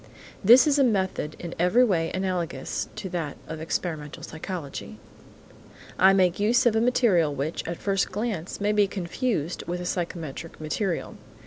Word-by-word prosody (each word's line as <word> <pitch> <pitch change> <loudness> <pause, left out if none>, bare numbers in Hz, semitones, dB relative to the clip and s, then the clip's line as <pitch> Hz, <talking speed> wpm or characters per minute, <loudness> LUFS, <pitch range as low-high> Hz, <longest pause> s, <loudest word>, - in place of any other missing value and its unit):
This 240 +5 +8
is 295 -1 +3
a - - +6
method 190 - 0
in 170 -1 -6
every 180 +9 +4
way 170 -8 +1
analogous 180 -7 -2
to 195 - -5
that 165 -5 -4
of 160 -1 -6
experimental 160 -2 -4
psychology. 160 -3 -6 1.0
I 190 +1 +7
make 185 -2 +3
use 235 +5 +3
of 235 -2 +4
a 220 - +3
material 200 - +3
which, 145 +4 -3
at 170 0 -3
first 195 -1 0
glance, 205 -4 -3
may 205 +1 +1
be 210 -1 +3
confused 185 - -2
with 175 +1 -3
psychometric 165 -3 -4
material. 165 +4 -2
180 Hz, 150 wpm, -26 LUFS, 165-210 Hz, 1.0 s, This